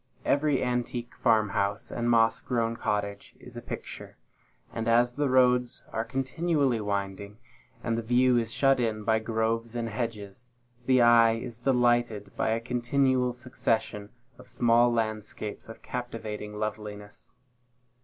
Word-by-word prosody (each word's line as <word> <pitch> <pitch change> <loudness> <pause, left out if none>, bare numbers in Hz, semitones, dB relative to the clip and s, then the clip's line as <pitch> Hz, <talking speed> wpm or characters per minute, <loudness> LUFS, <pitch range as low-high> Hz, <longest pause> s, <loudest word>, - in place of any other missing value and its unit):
Every 145 -1 +2
antique 125 -1 -2
farm 110 -3 +2
house 100 +1 -2
and 120 0 -1
moss 115 -1 +3
grown 115 -2 -1
cottage 100 -2 -3
is - - -13
a - - -6
picture; - - -8 0.6
and 115 0 -3
as 120 +1 +3
the 145 +1 0
roads 125 -1 +3
are 115 - -1
continually 135 0 0
winding, 100 0 -4 0.5
and 115 - 0
the 115 - -1
view 125 +2 +3
is 115 -1 -1
shut 135 0 +3
in 110 -3 -1
by 110 0 +2
groves 115 +1 -2
and 115 -1 -2
hedges, 115 0 -5 0.4
the 130 -1 +5
eye 115 -1 +6
is 115 0 -6
delighted 120 -4 +1
by - - 0
a 110 +1 +1
continual 125 +2 +1
succession 115 -4 -2 0.3
of - - -14
small 120 0 +3
landscapes 110 -2 -4
of 115 - -11
captivating 110 -4 -6
loveliness. 105 -1 -6
115 Hz, 140 wpm, -28 LUFS, 110-125 Hz, 0.6 s, eye